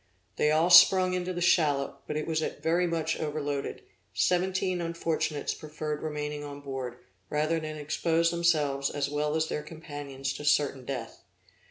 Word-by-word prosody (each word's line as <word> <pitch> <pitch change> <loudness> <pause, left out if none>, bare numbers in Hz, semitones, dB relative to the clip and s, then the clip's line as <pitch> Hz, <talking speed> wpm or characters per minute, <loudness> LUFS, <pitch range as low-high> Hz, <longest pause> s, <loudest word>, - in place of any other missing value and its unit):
They 150 - +3
all 160 +3 +3
sprung 185 +1 +8
into 180 0 -2
the 175 -1 -4
shallop; 150 -6 +2
but - - -3
as 155 - 0
it - - -9
was 160 -1 0 0.2
very 175 +2 +1
much 160 -1 -1
overloaded, 145 -2 -3 0.3
seventeen 185 0 +1
unfortunates 165 -3 -1
preferred 150 0 -5
remaining 150 -1 -4
on 145 -1 -7
board, 130 -3 -5 0.3
rather 155 +2 +1
than 155 -1 -6
expose 165 +3 +1
themselves 150 -5 +1
as 140 -1 -2
well 150 +1 0
as 160 0 +1
their 150 - -3
companions 145 -4 -6
to 145 - -7
certain 145 -3 +2
death. 125 -4 -6
155 Hz, 160 wpm, -28 LUFS, 145-170 Hz, 0.3 s, sprung